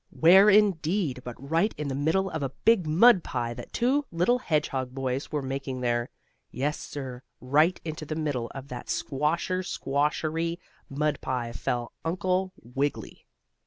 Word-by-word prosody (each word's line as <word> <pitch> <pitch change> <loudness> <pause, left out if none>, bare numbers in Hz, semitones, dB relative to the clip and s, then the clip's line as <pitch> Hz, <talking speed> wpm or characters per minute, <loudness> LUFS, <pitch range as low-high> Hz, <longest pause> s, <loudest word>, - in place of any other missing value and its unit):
Where, 190 +5 +6
indeed, 190 -8 +2
but 125 -1 -7
right 165 - 0
in 150 - -3
the 135 - -2
middle 160 +8 +1
of 160 - -3
a 135 - -1 0.2
big 220 -8 +4
mud 185 +4 +6
pie 120 -2 -3
that - - -9
two 265 +5 +1
little 180 +9 +2
hedgehog 135 - -1
boys 135 0 -3
were 150 -2 -1
making 135 -1 -4
there. 120 0 0 0.4
Yes, 145 +4 -2
sir, 130 -3 -7 0.2
right 150 +7 +3
into 155 -1 -5
the 155 - -3
middle 145 -7 -2
of 135 0 -8
that 125 -1 -7
squasher 160 +6 -1
squawshery 155 +2 -1 0.3
mud 150 +2 -1
pie 120 -2 -2
fell 120 +1 -3
Uncle 185 +2 0
Wiggily. 135 +4 -3
150 Hz, 155 wpm, -27 LUFS, 130-175 Hz, 0.4 s, Where